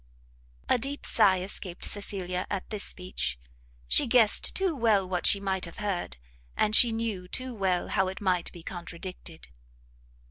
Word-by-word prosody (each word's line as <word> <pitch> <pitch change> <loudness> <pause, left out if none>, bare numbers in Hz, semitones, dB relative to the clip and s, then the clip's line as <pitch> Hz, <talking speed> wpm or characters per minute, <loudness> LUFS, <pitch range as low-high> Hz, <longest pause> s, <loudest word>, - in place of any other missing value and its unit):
A - - +3
deep 280 +4 -3
sigh 185 -2 +4
escaped 185 -1 -5
Cecilia 185 -3 -3
at 195 -2 -3
this 210 -2 -1
speech; 180 - -2 0.5
she - - +3
guessed 230 -3 +4
too 380 -4 0
well 220 -6 +2
what 180 -1 +1
she 200 - +5
might 190 -2 -1
have 170 - -11
heard, 195 - -3 0.4
and 215 0 +3
she 235 0 +7
knew 225 -5 -3
too 255 +6 -2
well 190 -4 -1
how 190 -2 +1
it 190 - -5
might 185 -3 0
be 170 -2 -12
contradicted. 175 -1 -8
190 Hz, 155 wpm, -28 LUFS, 180-215 Hz, 0.5 s, she